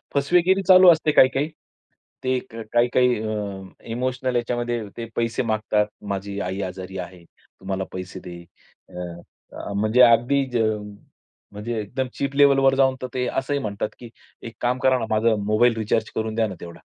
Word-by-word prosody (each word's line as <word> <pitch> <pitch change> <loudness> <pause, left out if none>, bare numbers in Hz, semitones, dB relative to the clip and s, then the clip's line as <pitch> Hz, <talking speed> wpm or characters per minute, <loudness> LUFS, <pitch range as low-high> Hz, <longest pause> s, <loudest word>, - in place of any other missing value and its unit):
फसवेगिरी 180 +7 +3
चालू 185 -1 +8
असते 155 -1 +2
काही-काही. 135 +3 +4 0.7
ते 130 0 +1 0.4
काही-काही 125 +1 +3
अ, 105 -3 -4 0.3
इमोशनल 130 +1 -2
याच्यामध्ये 120 0 -1 0.2
ते 115 - -4
पैसे 115 +2 -1
मागतात, 110 -1 0 0.2
"माझी 100 0 -4
आई 95 +2 -3
आजारी 95 0 -6
आहे, 90 -1 -8
तू 95 - -25
मला 95 0 -1
पैसे 95 0 -7
दे." 90 -1 -9 0.5
अ, - - -19 0.6
अ, 100 - -6
म्हणजे 110 +5 +2
अगदी, 125 +4 +5 1.1
म्हणजे 110 +3 -5
एकदम 125 +6 -3
चीप 140 0 -3
लेव्हलवर 135 -1 +5
जाऊन 130 -1 +3
तर 130 - -3
ते 125 -1 -1
असंही 140 +2 -1
म्हणतात, 105 -3 -3
की 120 -2 -10 0.3
"एक 115 -1 -8
काम 125 +1 +1
करा 130 -1 +4
ना, 115 - -2
माझा 110 +1 +2
मोबाईल 115 +3 +3
रिचार्ज 110 0 0
करून 110 0 -2
द्या 110 -1 +1
ना 95 - -7
तेवढा." 85 -1 -10
115 Hz, 160 wpm, -23 LUFS, 105-130 Hz, 1.1 s, चालू